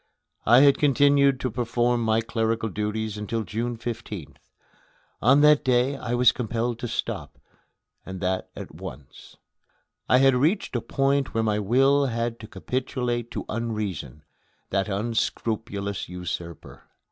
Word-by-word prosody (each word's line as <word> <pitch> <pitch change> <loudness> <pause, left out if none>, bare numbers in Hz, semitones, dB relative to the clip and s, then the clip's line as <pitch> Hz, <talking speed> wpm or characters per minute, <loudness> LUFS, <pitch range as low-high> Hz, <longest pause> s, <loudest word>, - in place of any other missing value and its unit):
I 120 +4 +7
had 140 -1 +5
continued 140 -1 +4
to 130 - -1
perform 120 +1 0
my 110 0 +2
clerical 115 0 -1
duties 105 +1 -3
until 110 +2 -2
June 115 +4 -3
15th. 110 -8 -6 0.8
On 135 +5 +5
that 150 0 +6
day 130 +1 +2
I 120 -3 -3
was 120 -1 +5
compelled 120 0 -2
to 120 - -3
stop, - - -4 0.7
and 95 0 -7
that 95 0 -2
at - - -8
once. 65 +1 -11 0.7
I 125 - +6
had 135 0 +5
reached 150 +6 +1
a 120 - 0
point 135 +3 0
where 115 - +2
my 105 -1 +1
will 135 +7 +3
had 115 -1 -2
to 110 - -9
capitulate 125 -1 -3
to - - -5
Unreason 105 - -4 0.5
that 100 +2 0
unscrupulous 105 -2 -2
usurper. 90 -2 -7
115 Hz, 135 wpm, -25 LUFS, 105-125 Hz, 0.8 s, I